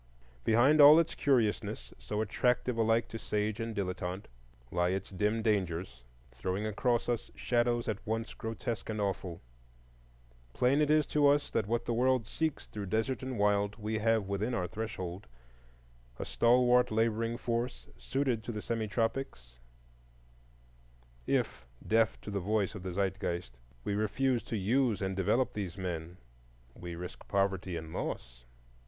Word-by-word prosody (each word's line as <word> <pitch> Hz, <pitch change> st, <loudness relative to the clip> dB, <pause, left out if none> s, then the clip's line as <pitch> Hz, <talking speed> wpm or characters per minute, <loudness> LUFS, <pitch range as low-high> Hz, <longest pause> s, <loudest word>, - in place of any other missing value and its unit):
Behind 130 Hz, +7 st, +5 dB
all 145 Hz, +2 st, +10 dB
its 165 Hz, -1 st, +2 dB
curiousness, 120 Hz, -7 st, 0 dB
so 70 Hz, -, -3 dB
attractive 125 Hz, +3 st, +1 dB
alike 115 Hz, 0 st, +2 dB
to 115 Hz, -, -6 dB
sage 105 Hz, +1 st, -1 dB
and 115 Hz, -1 st, -3 dB
dilettante, 95 Hz, 0 st, -3 dB, 0.5 s
lie 90 Hz, 0 st, +2 dB
its 95 Hz, +2 st, -3 dB
dim 105 Hz, +3 st, 0 dB
dangers, 90 Hz, -, -1 dB, 0.3 s
throwing 95 Hz, -, -3 dB
across 120 Hz, +3 st, 0 dB
us 120 Hz, -2 st, -1 dB
shadows 120 Hz, -1 st, +1 dB
at 105 Hz, -3 st, -2 dB
once 115 Hz, +2 st, -3 dB
grotesque 115 Hz, 0 st, -4 dB
and 110 Hz, -1 st, -2 dB
awful. 95 Hz, -4 st, -2 dB, 1.1 s
Plain 135 Hz, +4 st, +3 dB
it 150 Hz, -, +2 dB
is 155 Hz, -1 st, +4 dB
to 145 Hz, 0 st, +3 dB
us 145 Hz, +1 st, +3 dB
that 110 Hz, -3 st, 0 dB
what 115 Hz, +2 st, 0 dB
the 120 Hz, -, 0 dB
world 125 Hz, 0 st, +2 dB
seeks 160 Hz, +6 st, -2 dB
through 105 Hz, -2 st, -6 dB
desert 110 Hz, +6 st, 0 dB
and 130 Hz, -2 st, -4 dB
wild 100 Hz, 0 st, +2 dB
we 110 Hz, 0 st, -3 dB
have 110 Hz, -2 st, +2 dB
within 105 Hz, +5 st, -1 dB
our 90 Hz, -, 0 dB
threshold,—a -, -, -9 dB
stalwart 125 Hz, +1 st, +4 dB
laboring 115 Hz, +1 st, 0 dB
force, 120 Hz, +1 st, -2 dB
suited 115 Hz, -, -1 dB
to 120 Hz, -, -4 dB
the 105 Hz, -2 st, -5 dB
semi 115 Hz, -2 st, -2 dB
tropics; 100 Hz, -, -3 dB, 1.7 s
if, -, -, 0 dB, 0.2 s
deaf 115 Hz, 0 st, +2 dB
to 105 Hz, -, -7 dB
the 100 Hz, -, -1 dB
voice 100 Hz, +1 st, 0 dB
of 105 Hz, -, -7 dB
the 95 Hz, -1 st, -5 dB
Zeitgeist, 90 Hz, -7 st, -2 dB, 0.3 s
we 100 Hz, -, -1 dB
refuse 115 Hz, +4 st, +1 dB
to 115 Hz, -, -3 dB
use 115 Hz, +3 st, +2 dB
and 95 Hz, -1 st, -2 dB
develop 105 Hz, +7 st, +1 dB
these 95 Hz, -3 st, -4 dB
men, 90 Hz, -2 st, -4 dB, 0.6 s
we 85 Hz, +4 st, -7 dB
risk 90 Hz, +1 st, -8 dB
poverty 95 Hz, -3 st, 0 dB
and 80 Hz, 0 st, -7 dB
loss. -, -, -5 dB
110 Hz, 150 wpm, -32 LUFS, 95-120 Hz, 1.7 s, all